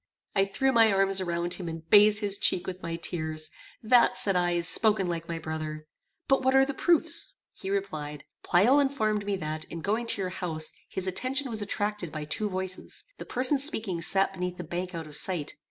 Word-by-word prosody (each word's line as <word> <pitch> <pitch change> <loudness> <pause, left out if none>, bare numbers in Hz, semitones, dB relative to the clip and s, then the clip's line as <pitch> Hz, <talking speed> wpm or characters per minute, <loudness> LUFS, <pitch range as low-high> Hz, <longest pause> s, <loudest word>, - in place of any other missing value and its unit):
I 195 -1 +4
threw 265 +7 0
my 225 -3 +5
arms 195 0 +3
around 175 -1 -1
him, 180 -3 -3
and 165 0 -8
bathed 210 +3 +6
his 200 -1 -1
cheek 175 - +4
with 185 0 -6
my 165 0 -4
tears. 155 -2 -3 0.3
"That," 240 +2 +4
said 195 -2 +2
I, 175 -1 +2
"is 170 -1 +1
spoken 210 -3 +3
like 165 -1 -4
my 170 - -4
brother. 155 -1 -5 0.4
But 270 0 +3
what 260 +1 +3
are 270 0 +6
the 275 - -3
proofs?" 335 - +1 0.2
He 190 - -7
replied 155 -7 -4 0.2
"Pleyel 225 +11 +4
informed 215 -7 0
me 200 - 0
that, 155 -3 -4
in 165 - -8
going 220 +6 -1
to 205 - 0
your 185 - -2
house, 160 -4 -3 0.2
his 190 - -1
attention 255 +8 -1
was 220 -1 0
attracted 205 -3 -2
by 155 -1 -5
two 210 +8 -1
voices. 185 0 -4 0.2
The - - -7
persons 260 +2 +2
speaking 215 - -2
sat 195 +3 +2
beneath 180 -1 -4
the 180 - -5
bank 175 +2 -5
out 165 -1 -5
of 150 -1 -9
sight. 170 -3 0
190 Hz, 205 wpm, -28 LUFS, 170-215 Hz, 0.4 s, bathed